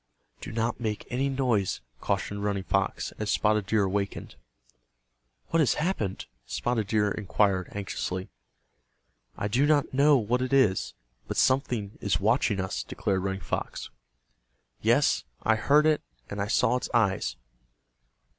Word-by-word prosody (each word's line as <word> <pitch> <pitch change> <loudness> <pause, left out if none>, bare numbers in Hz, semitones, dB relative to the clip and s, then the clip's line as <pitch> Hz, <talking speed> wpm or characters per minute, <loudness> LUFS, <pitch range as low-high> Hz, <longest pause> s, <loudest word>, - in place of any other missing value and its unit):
"Do - - -7
not 115 +2 -1
make 110 -3 -3
any 135 +3 0
noise," 125 -8 0 0.2
cautioned 100 +1 -2
Running 100 -2 -1
Fox, 95 0 -1
as 110 -1 -2
Spotted 105 -2 +2
Deer 110 -2 +2
awakened. 100 +1 -2 1.2
"What 165 - +2
has 145 -7 +3
happened?" 150 - -2 0.2
Spotted 115 -4 -1
Deer 105 -1 +2
inquired, 100 -2 +1
anxiously. 95 -2 -4 1.1
"I 105 - -1
do 125 +7 +2
not 150 -3 +2
know 140 +2 +5
what 120 +2 0
it 130 +1 -2
is, 130 -9 +3 0.3
but - - -4
something 120 -6 +1
is 90 -5 +1
watching 105 0 +2
us," 95 0 -2
declared 95 -1 -2
Running 95 0 -3
Fox. - - -4 0.9
"Yes, - - +3 0.2
I 110 - +4
heard 145 +7 +4
it, 155 -1 +3 0.3
and 100 0 -3
I 100 - -1
saw 125 +2 +3
its - - -5
eyes." 105 -5 +1
110 Hz, 140 wpm, -27 LUFS, 100-125 Hz, 1.2 s, know